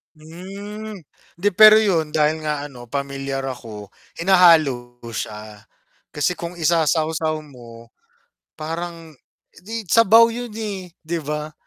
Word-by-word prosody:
Hmm, 200 +7 -9 0.4
hindi 200 +4 0
pero 215 0 +10
yun 180 -8 +2
dahil 155 0 +1
nga 150 -1 -1
ano 120 -2 -12
pamilyar 135 0 -4
ako 110 -5 -9 0.2
hinahalo 160 -9 +3
siya, 105 -1 -7 0.5
kasi 160 +5 -1
kung 170 +1 -6
isasawsaw 160 -1 +1
mo, 120 -5 -14 0.7
parang, 165 0 -6 0.4
eh, 220 +3 -7
sabaw 230 +3 +5
yun, 245 0 -5
eh, 195 -5 -5 0.2
'di 170 +1 -2
ba? 150 +1 -5
160 Hz, 115 wpm, -21 LUFS, 135-185 Hz, 0.7 s, pero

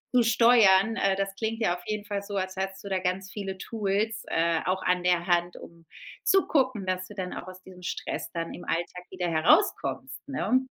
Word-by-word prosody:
zu 245 - +6
steuern.“ 225 -3 +5
Äh, 195 -1 +2
das 195 0 -2
klingt 225 +1 -2
ja 175 -5 +2
auf 175 - -11
jeden 210 -1 -3
Fall 200 -1 -3
so, 200 0 -6
als 185 0 -2
hättest 190 +1 -4
du 200 - -6
da 190 - +1
ganz 185 +1 -2
viele 195 -2 -5
Tools, 215 +1 -1
äh, 165 0 +1
auch 185 +1 0
an 180 -1 +1
der 175 -1 +2
Hand, 175 0 +1
um 170 -1 -13 0.4
zu 385 0 +3
gucken, 255 - +1
dass 185 0 -1
du 210 - -11
dann 185 -2 -4
auch 185 - -7
aus 185 0 -10
diesem 185 -1 -14
Stress - - -4
dann 165 -1 -4
im 175 - -10
Alltag 175 +2 -3
wieder 185 -1 -2
herauskommst, 240 - +1
ne? 260 -1 +1
190 Hz, 210 wpm, -27 LUFS, 180-215 Hz, 0.4 s, zu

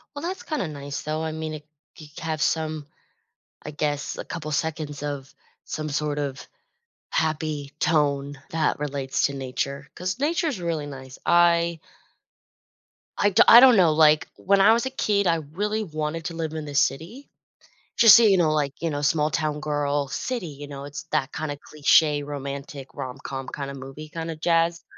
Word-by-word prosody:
Well, 285 - -6
that's 375 +2 -4
kinda 305 - -2
nice, 145 -2 -6
though. 155 +1 -3
I 160 0 -3
mean, 155 0 -4
i 150 - -8 0.4
you 155 - -11
have 160 -1 -3
some 155 -2 -1 0.8
I - - -6
guess, 145 -1 -2
a - - -5
couple 155 -2 -6
seconds 150 -1 -3
of 145 -2 -5 0.3
some 155 0 -4
sort 150 0 -2
of 140 -2 -4 0.6
happy 155 -3 -1
tone 145 -2 +1
that 160 -1 0
relates 140 -2 -1
to 140 - -7
nature 140 +1 -4
'cause 185 +5 -3
nature 330 +5 0
is 265 -11 -2
really 165 -4 -2
nice. 130 -2 -9
I 170 -1 +3 1.4
I 205 - +3
do 200 - +6
I 235 - +11
don't 255 -2 +8
know, 175 -5 +5
like, 155 0 +4
when 200 +1 +2
I 205 +3 +7
was 235 +3 +1
a - - -1
kid, 205 -6 0
I 170 - +3 0.2
really 210 +5 -1
wanted 155 -1 -4
to 170 - -4
live 160 -2 -3
in 155 -1 -4
the 145 -1 -7
city. 170 - -1 0.7
Just 230 -4 +9
so 235 - +6
you 200 -3 +5
know, 165 -4 +3
like, 145 -3 0
you 165 - -1
know, 145 -1 -3
small-town 150 0 0
girl, 145 -1 -1
city, 235 - -3
you 145 -1 -9
know, 140 -1 -8
it's 145 0 -7
that 135 - 0
kinda 150 -2 -4
cliché 150 0 +2
romantic 140 -1 -6
rom-com 135 +1 -6
kinda 140 -1 -5
movie, 135 +3 -9
kinda 165 0 -5
jazz, 165 +1 +1
155 Hz, 175 wpm, -24 LUFS, 145-170 Hz, 1.4 s, I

